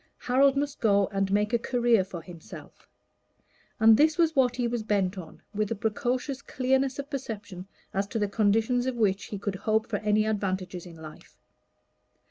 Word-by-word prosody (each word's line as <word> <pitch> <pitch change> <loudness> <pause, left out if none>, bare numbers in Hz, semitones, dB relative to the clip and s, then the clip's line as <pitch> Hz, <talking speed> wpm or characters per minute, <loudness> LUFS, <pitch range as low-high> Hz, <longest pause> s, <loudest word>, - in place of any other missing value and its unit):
Harold 270 +2 +3
must 285 0 -2
go 200 -3 +3
and 195 0 -1
make 210 +3 +1
a 235 - +3
career 240 -4 +2
for 180 -3 -8
himself 170 -2 -12 0.9
and 220 0 +7
this 310 +3 +3
was 325 -2 +2
what 250 -3 +3
he 245 -1 0
was 235 -1 -2
bent 205 -3 0
on, 175 -4 -10
with 210 0 -1
a 230 - -1
precocious 245 +6 -2
clearness 265 0 0
of 280 0 -5
perception 215 -9 -6 0.3
as 195 +1 -1
to 215 - -4
the 205 -2 +1
conditions 225 +4 +1
on 260 - -1
which 205 -4 +1
he 205 - -6
could 200 0 -3
hope 220 +2 0
for 215 - -1
any 210 +1 +1
advantages 190 -4 -3
in 170 - -12
life. 155 -1 -13
220 Hz, 180 wpm, -27 LUFS, 195-250 Hz, 0.9 s, and